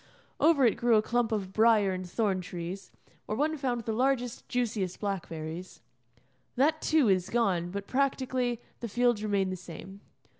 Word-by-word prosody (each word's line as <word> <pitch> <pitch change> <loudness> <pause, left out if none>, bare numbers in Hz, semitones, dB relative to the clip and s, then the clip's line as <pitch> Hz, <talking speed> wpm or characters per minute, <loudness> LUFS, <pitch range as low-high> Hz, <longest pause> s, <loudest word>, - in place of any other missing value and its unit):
Over 300 -4 +5
it 230 - +3
grew 235 -1 +3
a 215 - +5
clump 240 0 0
of 195 -3 -2
briar 215 -3 +4
and 185 -1 -5
thorn 195 -2 0
trees, 180 +1 -7 0.4
where 215 - -2
one 310 +3 +1
found 255 -5 -1
the 225 0 -3
largest, 250 0 0
juiciest 220 -7 -1
blackberries; 175 -3 -5 0.7
that 310 +5 +2
too 310 -6 +3
is 185 -2 +2
gone, 190 -7 +1
but, 200 +2 -5
practically, 260 -2 0 0.2
the 235 - -4
fields 240 0 +2
remain 200 -3 0
the - - -2
same. 185 +2 -10
215 Hz, 160 wpm, -29 LUFS, 190-245 Hz, 0.7 s, Over